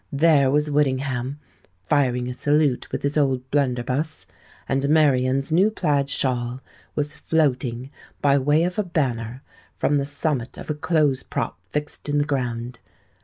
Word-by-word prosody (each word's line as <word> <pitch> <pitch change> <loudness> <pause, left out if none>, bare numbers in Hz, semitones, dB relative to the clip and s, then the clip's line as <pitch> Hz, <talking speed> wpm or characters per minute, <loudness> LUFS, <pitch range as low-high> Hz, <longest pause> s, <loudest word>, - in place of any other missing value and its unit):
There 145 -2 +4
was 150 +2 +1
Whittingham 135 -1 0 0.4
firing 125 -1 +1
a 125 - -3
salute 145 -1 +1
with - - -3
his 145 +2 +1
old 130 -3 0
blunderbuss; 130 -3 0 0.4
and 135 +1 0
Marian's 135 -3 +3
new 185 +6 +4
plaid 145 -9 0
shawl 125 -2 -1 0.4
was 150 0 -1
floating, 130 -5 0 0.3
by 140 -1 +3
way 145 +4 +3
of 180 +3 -1
a - - +2
banner, 130 - -2 0.3
from 145 0 +1
the 140 - -1
summit 140 -3 -1
of - - -5
a - - +1
clothes' 150 -3 +1
prop - - -4
fixed 150 0 -3
in 145 - +1
the 145 - +3
ground. 125 -4 -3
140 Hz, 150 wpm, -23 LUFS, 125-150 Hz, 0.4 s, There